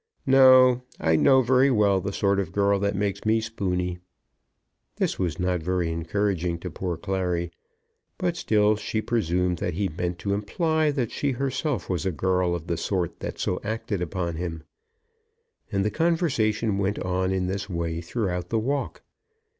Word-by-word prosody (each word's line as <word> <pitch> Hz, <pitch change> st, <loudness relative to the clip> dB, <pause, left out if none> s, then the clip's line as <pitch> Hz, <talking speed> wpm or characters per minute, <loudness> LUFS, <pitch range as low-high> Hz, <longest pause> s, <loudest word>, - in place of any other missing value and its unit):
"No; 130 Hz, -2 st, +7 dB, 0.2 s
I 80 Hz, 0 st, +2 dB
know 130 Hz, -, +5 dB
very 130 Hz, +3 st, +4 dB
well 105 Hz, -6 st, +3 dB
the 100 Hz, -, -3 dB
sort 100 Hz, 0 st, +1 dB
of 95 Hz, -4 st, -3 dB
girl 100 Hz, +1 st, +2 dB
that 100 Hz, 0 st, 0 dB
makes 100 Hz, 0 st, -2 dB
me 110 Hz, +1 st, +3 dB
spoony." 90 Hz, -5 st, -2 dB, 1.0 s
This -, -, -1 dB
was 85 Hz, -4 st, -1 dB
not 90 Hz, -1 st, 0 dB
very 90 Hz, 0 st, -1 dB
encouraging 85 Hz, +1 st, -1 dB
to 90 Hz, -, -5 dB
poor 90 Hz, 0 st, -3 dB
Clary, 90 Hz, -3 st, -2 dB, 0.7 s
but 180 Hz, -3 st, -1 dB
still 105 Hz, -7 st, +2 dB
she 110 Hz, +1 st, -3 dB
presumed 90 Hz, -6 st, 0 dB
that 90 Hz, -, -2 dB
he 100 Hz, +1 st, 0 dB
meant 85 Hz, +2 st, -3 dB
to 100 Hz, +2 st, -2 dB
imply 155 Hz, -, 0 dB
that 135 Hz, -6 st, -1 dB
she 140 Hz, -2 st, -1 dB
herself 135 Hz, +2 st, -2 dB
was 90 Hz, -3 st, -1 dB
a -, -, +1 dB
girl 90 Hz, +2 st, +1 dB
of 85 Hz, -2 st, -6 dB
the 85 Hz, -1 st, -2 dB
sort 90 Hz, -1 st, -2 dB
that -, -, -5 dB
so 90 Hz, -, -1 dB
acted 110 Hz, -2 st, -3 dB
upon 85 Hz, -2 st, -3 dB
him. 80 Hz, -2 st, -4 dB, 1.1 s
And 100 Hz, 0 st, 0 dB
the 105 Hz, -, +1 dB
conversation 120 Hz, -, +1 dB
went 100 Hz, +1 st, 0 dB
on 95 Hz, +1 st, -1 dB
in 95 Hz, -1 st, 0 dB
this 100 Hz, +2 st, -3 dB
way 85 Hz, -2 st, -2 dB
throughout 90 Hz, -2 st, -3 dB
the 115 Hz, -, 0 dB
walk. 135 Hz, +5 st, -2 dB
100 Hz, 170 wpm, -25 LUFS, 90-110 Hz, 1.1 s, No